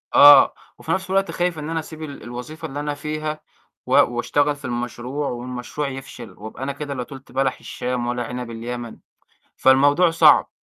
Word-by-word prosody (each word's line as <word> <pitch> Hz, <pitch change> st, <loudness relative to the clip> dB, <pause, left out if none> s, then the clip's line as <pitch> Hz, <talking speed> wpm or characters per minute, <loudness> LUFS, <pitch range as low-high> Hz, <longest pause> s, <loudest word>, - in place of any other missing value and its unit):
آه، 145 Hz, 0 st, +9 dB, 0.2 s
وفي 160 Hz, -, -5 dB
نَفْس 190 Hz, +1 st, -1 dB
الوقت 195 Hz, +1 st, +1 dB
خايف 175 Hz, -2 st, -1 dB
إن 150 Hz, -, -5 dB
أنا 165 Hz, 0 st, -1 dB
أسيب 155 Hz, 0 st, -8 dB
ال 140 Hz, -2 st, -8 dB
الوظيفة 125 Hz, +6 st, -7 dB
اللي 145 Hz, +2 st, -6 dB
أنا 145 Hz, 0 st, -2 dB
فيها 155 Hz, +1 st, -4 dB, 0.4 s
و -, -, -8 dB
وأشتغل 145 Hz, +5 st, +2 dB
في 145 Hz, -, -11 dB
المشروع 125 Hz, +4 st, -3 dB
والمشروع 125 Hz, +4 st, -4 dB
يفشل 130 Hz, -4 st, -8 dB
وأبقى 110 Hz, +5 st, -8 dB
أنا 140 Hz, -, -2 dB
كده 140 Hz, 0 st, -5 dB
لا 125 Hz, -2 st, -3 dB
طُلْت 135 Hz, +1 st, -12 dB
بَلَح 130 Hz, -1 st, 0 dB
الشام 125 Hz, -1 st, -3 dB
ولا 120 Hz, 0 st, -1 dB
عِنَب 125 Hz, 0 st, -6 dB
اليمن. 120 Hz, +1 st, -6 dB, 0.6 s
فالموضوع 145 Hz, +6 st, +5 dB
صعب 165 Hz, -, +5 dB
135 Hz, 175 wpm, -22 LUFS, 125-150 Hz, 0.6 s, آه